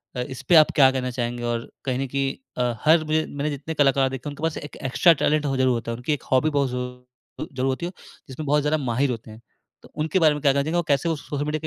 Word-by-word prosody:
अ, 125 - -2
इसपे 130 +5 0
आप 155 -1 +7
क्या 135 -3 +7
कहना 130 -1 -2
चाहेंगे? 120 -1 -3
और 120 -1 -3
कहीं 130 -1 -1
न 135 - -2
कहीं 135 +1 -1 0.2
अ, 125 -1 +1
हर 160 +1 +5
मुझे 155 0 0
मैंने 145 +1 -3
जितने 145 +2 -5
कलाकार 135 -3 +3
देखे 135 +2 -6
हैं, - - -6
उनके 145 +2 -10
पास 160 -1 -1
एक 145 - -8 0.2
एक्स्ट्रा 170 +6 +6
टैलेंट 150 0 +2
हो 135 -1 0
ज़रूर 130 0 +3
होता 115 0 -3
है। - - -3
उनकी 125 +5 -1
एक 145 - -4
हॉबी 130 +4 +3
बहुत 140 -3 +1
ज़रू 125 0 -3 0.5
अ, - - -3
ज़रूर 130 0 -2
होती 135 +6 -2
है, 175 - -4 0.4
जिसमें 135 +4 -7
बहुत 150 +1 +2
ज़्यादा 150 +2 +1
माहिर 130 +2 +1
होते 115 -2 -7
हैं। 110 +2 -13 0.4
तो - - -17
उनके 160 +4 +1
बारे 155 -3 +5
में 150 - -5
क्या 140 -1 +4
कहना 140 0 +1
चाहेंगे, 160 +4 -1
वो 175 - +1
कैसे 145 +3 +1
वो 165 - 0
सोशल 145 -1 -4
मीडिया 150 +1 -2
140 Hz, 280 wpm, -24 LUFS, 125-150 Hz, 0.5 s, आप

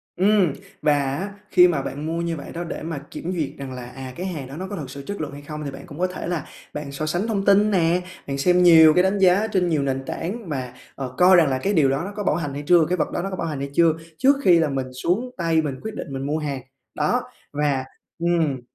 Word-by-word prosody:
Ừm. 190 -4 +3 0.3
Và 150 -1 +4
á 160 +10 -3 0.2
khi 180 -1 +7
mà 155 -6 0
bạn 145 +3 -5
mua 165 +1 -2
như 170 -1 -2
vậy 140 - -8
đó 170 - -4
để 165 - -6
mà 165 -2 -4
kiểm 180 - -5
duyệt 155 -5 -1
rằng 130 -2 -7
à, 125 0 -8
à, 130 -1 -7
cái 180 - -5
hàng 155 -8 -4
đó 140 +3 -9
nó 190 - -5
có 205 - -5
thực 145 -8 -6
sự 140 +1 -8
chất 200 -4 -4
lượng 145 - -4
hay 145 - -9
không, 150 +1 -7
thì 140 - -4
bạn 135 - -10
cũng 150 +1 -10
có 185 - +2
thể 180 - -6
là 175 -3 -2 0.3
bạn 150 -1 -5
so 145 +3 -3
sánh 175 +7 -1
thông 200 -3 -1
tin 205 +1 +5
nè, 175 -1 +2 0.3
bạn 140 0 -2
xem 180 +5 +3
nhiều 160 -3 +8
cái 180 - +4
đánh 190 +2 +2
giá 190 +3 +4
trên 185 -4 +1
nhiều 150 -4 +1
nền 135 -1 -2
tảng 195 +1 -5
và, 130 -3 -4 0.2
ờ, 130 -2 -5
coi 185 +1 +7
rằng 165 -4 +5
là 130 - 0
cái 200 +10 -1
điều 145 -6 +4
đó 135 +2 0
nó 200 - -5
có 205 - -3
bảo 150 - +2
hành 150 -5 -3
hay 145 +1 -5
chưa, 170 -2 +6
cái 180 - +1
vật - - -1
đó - - -2
nó 195 - -3
có 185 - -4
bảo 170 - -3
hành 150 -3 -4
hay 140 0 -4
chưa, 165 -1 +4 0.2
trước 275 +7 +5
khi 175 -2 +6
là 155 -2 +2
mình 130 -2 -3
xuống 195 - -1
tay 165 -2 +2
mình 145 -3 -3
quyết 220 0 -6
định - - -5
mình 135 0 -4
mua 150 +2 0
hàng. 140 -4 -3 0.3
Đó, - - +1 0.3
và 145 -3 0 0.3
ừm, 165 -6 +1
160 Hz, 280 wpm, -23 LUFS, 140-180 Hz, 0.3 s, nhiều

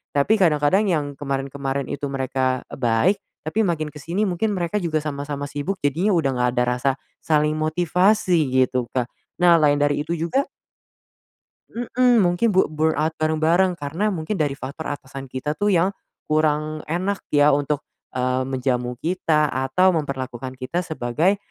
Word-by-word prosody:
tapi 145 +11 +3
kadang-kadang 170 +2 +3
yang 145 -5 -1
kemarin-kemarin 135 -1 -3
itu 140 0 -3
mereka 130 -1 -1
baik, 125 - +2 0.3
tapi 210 +8 +1
makin 155 -4 -1
ke 150 - -12
sini 180 +8 -1
mungkin 205 +4 0
mereka 180 +1 -1
juga 155 -3 0
sama-sama 145 -1 -4
sibuk, 145 +8 -3
jadinya 165 +9 +1
udah 160 -6 +2
nggak 125 0 +2
ada 125 - +4
rasa 135 +2 +2 0.3
saling 150 0 +2
motivasi 175 +2 +2 0.2
gitu 125 -1 +1
Kak. 125 -2 -1 0.3
Nah 175 -1 +7
lain 145 -1 +4
dari 145 0 +1
itu 170 - -2
juga 170 - 0 1.2
Mmm, 245 0 +2
mungkin 175 +6 +2
bur 190 -1 +4
burnout 155 0 +1
bareng-bareng, 165 +4 +2
karena 160 +9 -1
mungkin 175 +3 -3
dari 145 -3 0
faktor 145 +4 -6
atasan 135 -1 -8
kita 130 +4 -3
tuh 205 +6 0
yang 185 +2 +2 0.3
kurang 155 0 0
enak 185 +5 -1
ya 145 0 +4
untuk, 145 +1 -1 0.3
eee, 130 0 0
menjamu 125 -2 -1
kita 160 -2 +1
atau 135 +9 +2
memperlakukan 130 -4 -4
kita 130 +7 -2
sebagai 160 - 0
150 Hz, 150 wpm, -22 LUFS, 135-175 Hz, 1.2 s, Nah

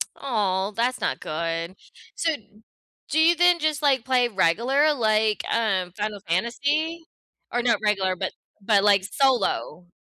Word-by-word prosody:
Oh, 205 -6 -1
that's 250 +2 0
not - - -1
good. 165 +2 -4 0.4
So, 325 -1 0
d 210 -4 -19 0.5
do 315 - +1
you 335 +2 +5
then 350 0 +4
just, 310 -1 -1
like, 270 -5 +2
play 255 -2 +2
regular, 235 - +2
like, 215 -4 +1
um, 195 -6 0
Final 210 0 -3
Fantasy? 285 - -1 0.5
Or 245 - 0
not 240 -1 +1
regular, 195 -3 +1
but - - -3 0.3
but, 200 0 +2
like, 200 -2 +4
solo? 245 -7 0
225 Hz, 145 wpm, -24 LUFS, 195-275 Hz, 0.5 s, you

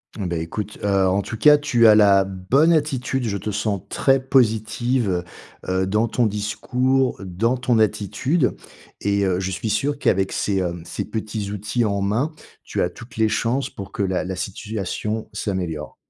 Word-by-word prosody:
Bah 90 -6 -3
écoute, 100 +6 -5
heu, 100 -2 +2
en 95 +2 +2
tout 110 +3 -6
cas, 150 +4 +7
tu 130 -6 +2
as 110 - +9
la 100 -2 +6
bonne 95 - +2
attitude. 130 -4 0
Je 100 -2 -1
te 105 +3 -4
sens 105 -1 -1
très 135 0 +3
positive, 110 -5 +1 0.4
heu, 95 0 +1
dans 105 +4 +1
ton 120 +1 +1
discours, 125 +6 0
dans 110 +8 0
ton 125 -1 +1
attitude 115 - +1 0.5
et 100 0 +1
heu, 90 -1 +1
je 95 0 -2
suis 110 +4 -3
sûr 140 +7 0
qu'avec 95 -6 +1
ces, 100 -2 0
hem, 85 -2 -3
ces - - -4
petits 110 -2 -4
outils 105 +4 -1
en 100 -1 0
main, 110 +10 0 0.3
tu - - -3
as 90 - +1
toutes 115 +7 -13
les 110 -1 +3
chances 125 +5 0
pour 100 -2 -9
que - - -4
la 95 -2 0
la 95 0 -4
situation 105 +2 -4
s'améliore. 90 -7 -3
105 Hz, 175 wpm, -22 LUFS, 95-120 Hz, 0.5 s, as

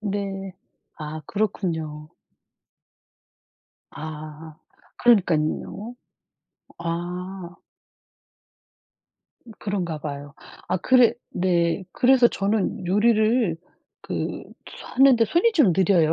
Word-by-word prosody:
네. 195 -2 -4 0.5
아 155 0 -6
그렇군요. 160 -7 -2 1.8
아 155 0 -9 0.4
그러니깐요. 200 +1 +1 0.8
아. 175 +2 -5 2.0
그런가 180 -6 -3
봐요. 145 0 -7 0.3
아 - - +1
그래 250 +1 +5 0.2
네. 175 0 +1
그래서 255 -1 +5
저는 195 -3 -1
요리를 215 -1 +3 0.5
그 - - -4 0.5
하는데 255 -3 +6
손이 345 - +2
좀 290 - +4
느려요. 175 -3 +3
185 Hz, 150 characters per minute, -24 LUFS, 160-215 Hz, 2.0 s, 하는데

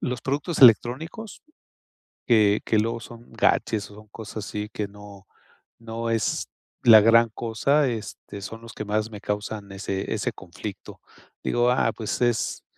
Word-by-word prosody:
los 125 -1 -3
productos 145 +5 -2
electrónicos 140 - +3 0.8
que 105 -3 +4
que 110 - +2
luego 115 +2 0
son 120 +1 -13
gadgets 105 -2 +1
o - - -13
son 105 0 -15
cosas 110 -1 -8
así 105 0 -4
que 105 - -3
no 100 -1 -13 0.5
no 115 0 -5
es 115 -1 0 0.4
la 110 -2 +9
gran 115 +2 +5
cosa, 125 +6 +1
este, 110 -3 -7
son 115 +4 -8
los 115 0 -11
que - - -5
más 110 +2 -1
me 105 - -9
causan 105 -1 -4
ese 95 0 -4
ese - - -1
conflicto. - - -9 0.4
Digo: 120 0 +2
"Ah, 120 -2 +2
pues, 110 +1 -4
es 120 -2 0
110 Hz, 155 wpm, -25 LUFS, 105-120 Hz, 0.8 s, la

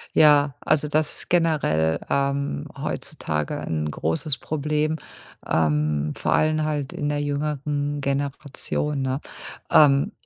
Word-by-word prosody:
Ja, 145 -2 +6
also 155 -1 +2
das 150 0 +1
ist - - -6
generell, 150 - +2
ähm, 140 - -1
heutzutage 75 -1 -3
'n 75 -1 -2
großes 80 - -1
Problem, 150 +1 -1 0.5
ähm, 75 -1 +1
vor - - 0
allem 155 0 +2
halt 150 -3 -2
in 145 - -2
der 145 0 0
jüngeren 145 0 -2
Generation, 140 +1 -2
ne? 130 +2 -1 0.5
Ähm, 145 +6 +5
145 Hz, 115 wpm, -24 LUFS, 130-150 Hz, 0.5 s, Ja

